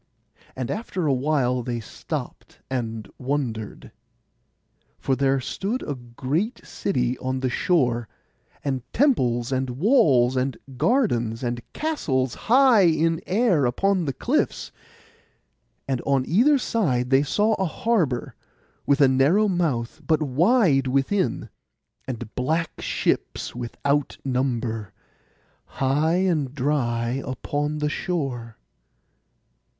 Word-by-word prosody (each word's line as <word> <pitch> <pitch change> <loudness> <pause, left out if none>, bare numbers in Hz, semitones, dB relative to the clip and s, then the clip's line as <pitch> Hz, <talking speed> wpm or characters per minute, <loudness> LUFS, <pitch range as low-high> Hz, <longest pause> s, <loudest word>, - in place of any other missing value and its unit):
But 130 -2 -3
after 195 -5 -3
awhile 130 -2 +1
they 120 0 -3
stopped, 110 - -7
and 115 -4 -3
wondered, 125 -6 -3 1.1
for 135 - 0
there 135 0 +2
stood 200 - -3
a 145 - -1
great 135 - -3
city 125 -9 -1
on 130 0 -2
the 130 -1 0
shore, 120 -8 +1 0.6
and 135 -2 -1
temples 125 - +2
and 130 0 0
walls 130 - +3
and 130 0 -1 0.2
gardens, 125 - +1
and 120 0 -2
castles 135 - -1
high 245 -4 +5
in 165 0 +1
air 185 - +3
upon 190 +8 +1
the 135 - -2
cliffs. - - -1 1.2
And 130 -3 -1
on 135 -2 +1
either 255 - +4
side 135 - 0
they 135 +1 +6
saw 210 +9 +1
a 190 - +1
harbour, 170 - 0 0.5
with 140 +1 +3
a 140 - +7
narrow 140 +11 +3
mouth, 155 - -1
but 155 -1 +2
wide 155 - +3
within; 140 +9 0 0.6
and 120 -4 -6
black 160 +6 -1
ships - - -1
without 140 +4 -2
number, 120 -5 -2 0.7
high 145 +5 +1
and 165 -8 0
dry 125 -3 0
upon 145 +3 -3
the 150 0 0
shore. 135 -10 -3
135 Hz, 115 wpm, -24 LUFS, 125-175 Hz, 1.2 s, a